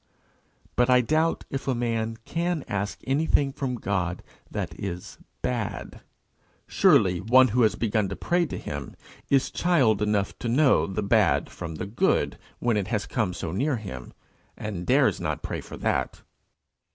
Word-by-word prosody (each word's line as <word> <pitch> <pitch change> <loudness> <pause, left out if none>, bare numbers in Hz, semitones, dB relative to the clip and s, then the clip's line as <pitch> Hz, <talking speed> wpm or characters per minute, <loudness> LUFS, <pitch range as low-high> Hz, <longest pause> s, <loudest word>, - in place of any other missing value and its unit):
But 125 +1 +3
I 125 0 +6
doubt 155 +6 +1
if 135 0 -4
a 130 - +1
man 115 -1 -1
can 170 -2 -1
ask 100 0 -3
anything 140 0 +2
from 135 -3 -2
God 90 -5 -2 0.3
that - - -4
is 90 -3 -6 0.2
bad. 120 -5 -3 0.6
Surely 90 -2 +4
one 130 +5 +6
who 125 +4 +2
has 110 -2 +4
begun 105 -3 0
to 100 - -4
pray 175 -1 +1
to - - -5
him - - -6 0.3
is 135 -1 +2
child 135 - +2
enough 105 -2 0
to 120 - -3
know 125 - +4
the 95 +2 -3
bad 105 -2 +2
from 80 -1 -6
the 90 - -4
good 105 +4 +1 0.2
when 120 -3 +1
it 100 -2 -1
has 105 -1 -1
come 110 -7 -1
so 85 - -5
near 135 - 0
him, 65 - -7 0.5
and 95 -5 -5
dares - - +3
not - - -3
pray - - -3
for - - -10
that. - - -1
115 Hz, 165 wpm, -26 LUFS, 100-130 Hz, 0.6 s, I